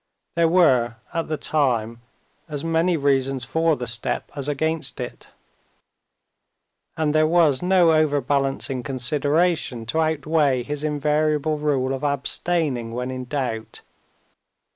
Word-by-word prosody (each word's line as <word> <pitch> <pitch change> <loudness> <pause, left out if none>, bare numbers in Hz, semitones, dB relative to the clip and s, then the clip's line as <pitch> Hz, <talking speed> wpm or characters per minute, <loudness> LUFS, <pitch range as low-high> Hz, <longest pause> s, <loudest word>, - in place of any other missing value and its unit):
There 170 -1 +3
were 130 -10 +3 0.2
at 165 -1 -2
the 155 - -2
time 120 -8 0 0.5
as 145 -2 -4
many 165 +1 +2
reasons 135 -2 0
for 160 +4 +1
the 125 - -5
step 115 0 -3
as 140 -1 -4
against 155 +2 -1
it, - - -7 1.7
and 155 -2 +1
there 155 0 +4
was 160 -5 +3
no 180 -2 +4
overbalancing 140 -3 +1
consideration 145 +1 0
to 160 +8 0
outweigh 150 -4 +1
his 150 +3 -5
invariable 150 0 0
rule 135 -3 0
of 135 +2 -5
abstaining 140 -3 -1
when 125 +1 -3
in 130 0 -5
doubt. 125 -5 -4
145 Hz, 120 wpm, -23 LUFS, 130-160 Hz, 1.7 s, there